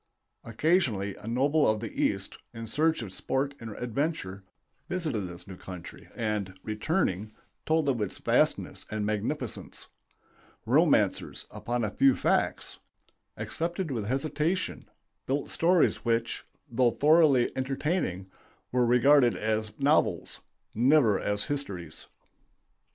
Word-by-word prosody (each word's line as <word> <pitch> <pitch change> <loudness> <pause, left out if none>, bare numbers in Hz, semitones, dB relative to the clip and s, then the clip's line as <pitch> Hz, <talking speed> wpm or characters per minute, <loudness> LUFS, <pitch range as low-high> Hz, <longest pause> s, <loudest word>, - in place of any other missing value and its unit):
Occasionally 115 - +1
a - - -11
noble 140 +5 +3
of 110 0 +1
the 110 -1 -5
East, - - -1 0.2
in 115 0 -6
search 155 +4 +1
of 95 -4 -7
sport 135 +7 -1
and 115 - -7
adventure, 120 - -3 0.5
visited 155 - -2
this 90 0 -10
new 95 - -8
country 90 -2 -10
and, 105 -4 -2
returning, 110 - -1 0.3
told 160 -2 +2
of 125 -5 +1
its 100 - -3
vastness - - +1
and 105 -1 -2
magnificence. 110 +4 -3 0.8
Romancers, - - +2
upon 120 0 -2
a 105 - -1
few 135 +4 +4
facts, - - 0 0.6
accepted 170 0 -3
with 115 -5 -2
hesitation, 150 - -1 0.4
built 140 +2 -1
stories 175 +1 +3
which, 115 0 -1 0.2
though 125 -1 +3
thoroughly 150 -2 +4
entertaining, 130 - -1 0.5
were 125 -1 +2
regarded 125 +1 +5
as 110 0 -1
novels, 145 +3 +1 0.3
never 120 -3 +4
as 105 0 -1
histories. 100 - -4
120 Hz, 120 wpm, -28 LUFS, 105-150 Hz, 0.8 s, regarded